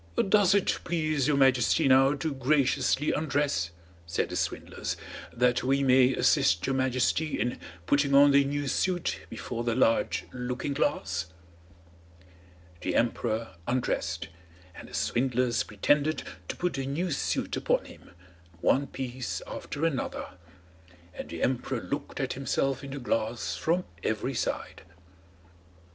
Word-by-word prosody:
"Does 200 -2 +5
it 200 - +1
please 155 -5 0
your 145 -2 +2
Majesty 130 -2 +4
now 135 +2 +5
to 145 +2 -2
graciously 135 +1 +2
undress," 145 - 0 0.4
said 85 - -1
the - - -5
swindlers, - - -3 0.3
"that 125 0 +2
we 135 +2 +2
may 130 0 +5
assist 85 +2 +3
your 135 - 0
Majesty 130 +4 +1
in 120 - -1 0.3
putting 140 +4 +2
on 140 +1 +8
the 140 0 +6
new 145 +1 -2
suit 175 +5 0
before 120 -1 -5
the 115 -1 0
large 115 -3 +2
looking 125 +3 -3
glass?" 110 - -1 1.5
The 90 - -2
emperor 115 -3 -1
undressed, 90 -10 -1 0.4
and - - -11
the - - -8
swindlers 125 -1 +1
pretended 145 +9 +1 0.2
to - - -4
put 180 0 -1
the 135 -1 -3
new 165 +6 -1
suit 135 - -1
upon - - 0
him, - - -14 0.5
one 140 +9 +2
piece 130 -2 -5
after 150 +3 -4
another; 150 -6 -2 0.8
and - - -8
the 85 - -4
emperor 130 0 0
looked 140 +5 -5
at 135 -2 -1
himself 135 +1 -1
in 135 - -7
the 140 - -5
glass 115 -2 -1
from 175 +3 0 0.2
every 110 +5 -1
side. - - -3
135 Hz, 135 wpm, -28 LUFS, 120-145 Hz, 1.5 s, on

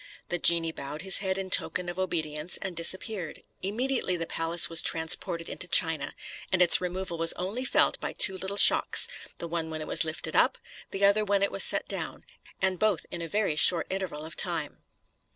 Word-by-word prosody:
The 175 - -2
genie 165 -1 +3
bowed 145 +1 -8
his 190 0 +3
head 190 -1 -3
in 190 -1 -6
token 180 -1 +1
of 175 +1 -6
obedience, 160 -3 -3
and 185 -2 -5
disappeared. 180 +1 -2 0.2
Immediately 225 -1 -2
the 165 - -4
palace 165 +1 +2
was 165 0 +5
transported 165 +1 +1
into 185 - -6
China, 160 -4 +1 0.4
and 190 - 0
its 180 0 +6
removal 180 -1 -5
was 165 0 +1
only 200 +8 -5
felt - - +1
by - - -5
two 190 - +4
little 190 +2 -4
shocks, - - +5 0.3
the 170 - -6
one 165 -1 -4
when 160 -1 -6
it 155 - -6
was - - +2
lifted 160 0 -5
up, - - +3 0.3
the 195 +1 0
other 200 +2 +3
when 200 -1 0
it 200 - 0
was - - +3
set - - +3
down, - - -6 0.4
and 190 -2 0
both 210 -7 0
in 170 - -6
a 165 - -5
very 205 -3 -1
short 165 +2 +4
interval 185 -6 -5
of 160 - -9
time. - - -2
175 Hz, 200 wpm, -27 LUFS, 165-190 Hz, 0.4 s, its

